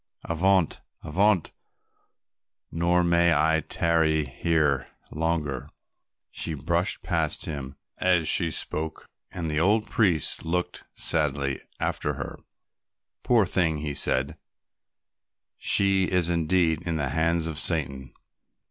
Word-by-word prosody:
Avaunt, 90 +1 +1 0.2
avaunt, 95 +3 +1 1.2
nor 85 +2 +1
may 85 0 +3
I 80 +2 +2
tarry 80 -3 +1
here 75 0 0 0.2
longer." 80 -4 -2 0.6
She 80 - -5
brushed 85 +5 -2
past - - -1
him 70 -3 -6 0.2
as 90 -4 +2
she 85 -3 +1
spoke, 80 0 -4 0.3
and 85 -3 -4
the 75 -1 -1
old 105 +6 +2
priest 95 - +2
looked 90 +2 -3
sadly 70 -3 0 0.2
after - - -1
her. - - -7 0.8
"Poor 115 -4 +3
thing," 85 -4 +1
he 75 -1 -4
said, 65 0 +2 1.2
"she 95 -1 +3
is 90 -2 +1
indeed 85 -1 +1
in 85 -2 -3
the 70 -3 -1
hands 80 +3 0
of 80 -1 0
Satan." 70 -7 +1
80 Hz, 110 wpm, -25 LUFS, 75-90 Hz, 1.2 s, may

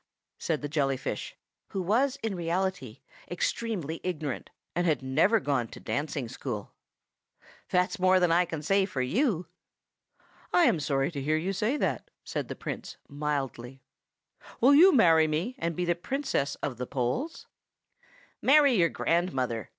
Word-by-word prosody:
said 155 -3 -2
the - - -1
jelly 140 -2 0
fish - - -5 0.3
(who 195 - -4
was 240 +9 +2
in 220 -2 -1
reality 175 - -2 0.3
extremely 175 -3 -2
ignorant, 155 -7 -4 0.3
and 175 +1 +1
had 155 -4 +1
never 160 +12 +3
gone 135 - 0
to - - -11
dancing 145 -3 -3
school), 115 -3 -6 1.0
"that's 180 +4 +1
more 185 0 +5
than 180 -2 +3
I 175 +2 +4
can 160 -3 -6
say 195 +4 +2
for 135 -9 -2
you!" 190 - 0 1.1
"I 355 - +4
am 175 - +4
sorry 140 0 0
to 145 -4 -5
hear 155 +3 +1
you 180 +5 -2
say 220 +9 0
that," - - -2
said - - -4
the - - -6
Prince, - - -6
mildly. 135 -3 -4 0.8
"Will 265 +4 +6
you 350 +7 +8
marry 165 - +5
me, 160 +11 -1
and 170 -1 -2
be 180 - -1
Princess 175 - -2
of 130 -5 -2
the 125 0 -4
Poles?" 140 - -2 1.0
"Marry 285 -1 +6
your 175 -7 +3
grandmother!" 130 - -1
165 Hz, 150 wpm, -28 LUFS, 140-195 Hz, 1.1 s, you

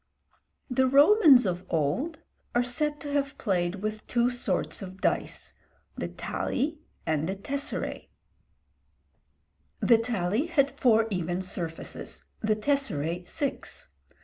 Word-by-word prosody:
The 260 0 +2
Romans 285 - +7
of 180 -1 -1
old 165 - 0 0.4
are 240 - +4
said 295 +5 -1
to 290 - -5
have 280 0 0
played 185 -1 -1
with 215 0 -4
two 240 0 +2
sorts 225 -7 0
of 190 0 -8
dice, - - -1 0.4
the - - -3
tali 300 +4 -2 0.3
and 155 +1 0
the 190 - -1
tesseræ. 280 +8 -3 1.7
The 230 -2 +5
tali 225 - 0
had 280 -5 +2
four 225 -3 +3
even 180 0 -1
surfaces, 170 -3 -5
the 215 -1 +2
tesseræ 180 - -1
six. 320 - -4
230 Hz, 120 wpm, -28 LUFS, 185-280 Hz, 1.7 s, Romans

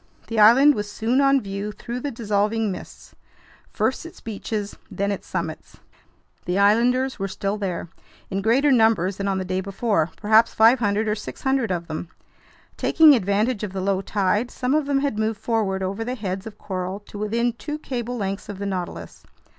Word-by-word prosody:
The 225 -1 -1
island 250 +8 +7
was 205 -4 -4
soon 235 +6 +1
on 275 0 +4
view 200 0 -4
through 235 +4 -6
the 285 - -3
dissolving 215 -2 0
mists, - - -10 0.6
first - - -1
its 335 - -11
beaches, 210 -1 -5
then 200 0 -1
its 200 - -5
summits. - - -5 0.7
The 180 +1 -1
islanders 245 +6 +3
were 195 - -1
still 195 +1 -2
there, 190 -5 -3 0.4
in 195 +1 -1
greater 260 +7 +3
numbers 220 -6 +3
than 200 - -2
on 195 -1 0
the 190 - -3
day 185 +1 -1
before, 195 -3 0
perhaps 220 +1 +4
500 220 -2 +4
or 210 - +2
600 265 +3 -2
of 175 -2 -2
them. 160 +1 -6 0.7
Taking 315 -2 +6
advantage 215 +1 +1
of 200 -3 -4
the 195 - -3
low 195 0 0
tide, 205 +4 0
some 250 +2 -2
of 300 -2 +1
them 275 -1 +1
had 275 -7 -1
moved 220 -1 -1
forward 210 -4 -1
over 195 +4 -2
the 250 +2 -3
heads 195 -3 -4
of 210 -1 -10
coral 185 0 -4
to 205 0 -10
within 230 +3 0
two 295 +6 -5
cable 245 -4 -4
lengths 195 -1 -4
of 205 - -6
the 200 - -4
Nautilus. 185 -3 -5
210 Hz, 185 wpm, -23 LUFS, 195-240 Hz, 0.7 s, island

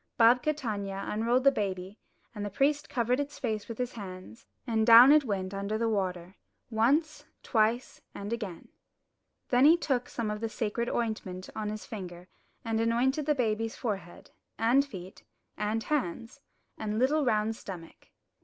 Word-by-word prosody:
Babka 250 +6 +5
Tanya 200 -7 -4
unrolled 235 +4 +1
the 275 - +7
baby, 195 -3 -4 0.3
and 210 -2 -5
the 205 - -3
priest 285 +7 +1
covered 245 +1 +1
its 285 0 -4
face 220 -4 -3
with 230 - -7
his 250 0 -3
hand, 190 +2 -9 0.2
and 225 -3 +1
down 235 +4 +10
it 300 -1 +5
went 195 -3 -2
under 200 +2 -2
the 230 +1 0
water, 185 -3 -2 0.3
once, 285 +8 +1 0.2
twice, 230 +1 0
and 205 +3 -4
again. 205 -8 -6 0.8
Then 250 +2 +5
he 325 +3 +7
took 260 -7 -1
some 225 -3 -3
of 210 0 -5
the 225 - -2
sacred 230 +2 -2
ointment 195 -5 -3
on 215 -1 -3
his 215 0 -6
finger 180 -4 -8 0.4
and 225 0 0
anointed 260 +6 +1
the 300 - +3
baby's 225 -3 -1
forehead, 195 -7 -5 0.3
and 240 +5 +4
feet, 190 -9 -10 0.3
and 215 +2 -1
hands, 230 - -3 0.4
and 215 -1 -2
little 285 +6 +2
round 220 -3 +1
stomach. 175 -6 -10
225 Hz, 160 wpm, -29 LUFS, 205-250 Hz, 0.8 s, down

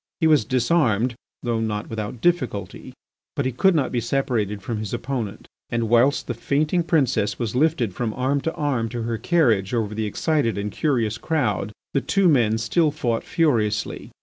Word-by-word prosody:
He 165 - +1
was 155 -2 +4
disarmed, 125 -3 +2 0.3
though 120 -2 0
not 110 -1 -2
without 110 +1 -5
difficulty, 125 - -1 0.4
but 140 -4 -1
he 130 - 0
could 180 +9 +3
not 145 -5 +1
be 120 - 0
separated 115 -5 -1
from 110 +1 -3
his 110 +1 -3
opponent. 120 -4 -4 0.2
And 115 -2 -1
whilst 120 +5 +3
the 120 - -3
fainting 150 +8 0
princess 130 - +1
was 115 -2 -3
lifted 135 - +1
from 115 +3 -2
arm 135 +2 0
to 165 - -2
arm 135 -8 -1
to 120 0 -4
her 115 -1 -2
carriage 120 - +2
over 110 -2 -1
the 110 0 -2
excited 145 +1 0
and 100 +1 -3
curious 115 -7 0
crowd, 110 - -1 0.2
the 140 - +2
two 195 +4 +2
men 120 -8 +3
still 135 +9 +2
fought 120 -6 -2
furiously. 115 - 0
120 Hz, 175 wpm, -23 LUFS, 110-145 Hz, 0.4 s, was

